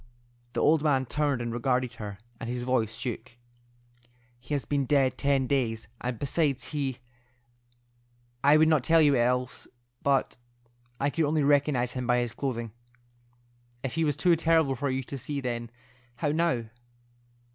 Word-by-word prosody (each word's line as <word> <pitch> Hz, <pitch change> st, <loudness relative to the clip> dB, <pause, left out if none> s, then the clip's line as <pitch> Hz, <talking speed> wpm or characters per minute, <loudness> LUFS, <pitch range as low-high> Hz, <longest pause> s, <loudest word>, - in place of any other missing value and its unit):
The -, -, -1 dB
old 155 Hz, 0 st, +4 dB
man 140 Hz, -4 st, +2 dB
turned 145 Hz, -2 st, 0 dB
and 120 Hz, -1 st, -3 dB
regarded 125 Hz, 0 st, 0 dB
her, 105 Hz, -4 st, -7 dB, 0.2 s
and 115 Hz, -, -5 dB
his 125 Hz, 0 st, -3 dB
voice 115 Hz, -3 st, 0 dB
shook. 120 Hz, -2 st, -5 dB, 1.1 s
"He 140 Hz, +4 st, -4 dB
has 140 Hz, -, -3 dB
been 140 Hz, -2 st, 0 dB
dead 135 Hz, -2 st, +3 dB
ten 140 Hz, -1 st, +1 dB
days, 120 Hz, -5 st, -1 dB, 0.2 s
and 125 Hz, -1 st, -2 dB
besides 140 Hz, 0 st, 0 dB
he—I 120 Hz, -1 st, -4 dB
would 155 Hz, +1 st, +5 dB
not 155 Hz, -5 st, +3 dB
tell 165 Hz, +3 st, +4 dB
you 145 Hz, -3 st, +5 dB
else, 125 Hz, +1 st, 0 dB, 0.3 s
but—I 120 Hz, -1 st, -3 dB
could 165 Hz, +1 st, +1 dB
only 150 Hz, 0 st, +1 dB
recognize 140 Hz, -3 st, +2 dB
him 125 Hz, -1 st, -4 dB
by 125 Hz, -1 st, +3 dB
his 120 Hz, -2 st, -1 dB
clothing. 120 Hz, -5 st, -3 dB, 1.1 s
If 130 Hz, -3 st, -3 dB
he 165 Hz, -, 0 dB
was 145 Hz, -2 st, 0 dB
too 175 Hz, +2 st, +4 dB
terrible 160 Hz, -3 st, +3 dB
for 140 Hz, +2 st, -2 dB
you 130 Hz, 0 st, -1 dB
to 135 Hz, +2 st, -7 dB
see 140 Hz, +3 st, -3 dB
then, 120 Hz, -3 st, -3 dB, 0.5 s
how 145 Hz, -, -1 dB
now?" 160 Hz, -5 st, +1 dB
130 Hz, 155 wpm, -28 LUFS, 120-145 Hz, 1.1 s, would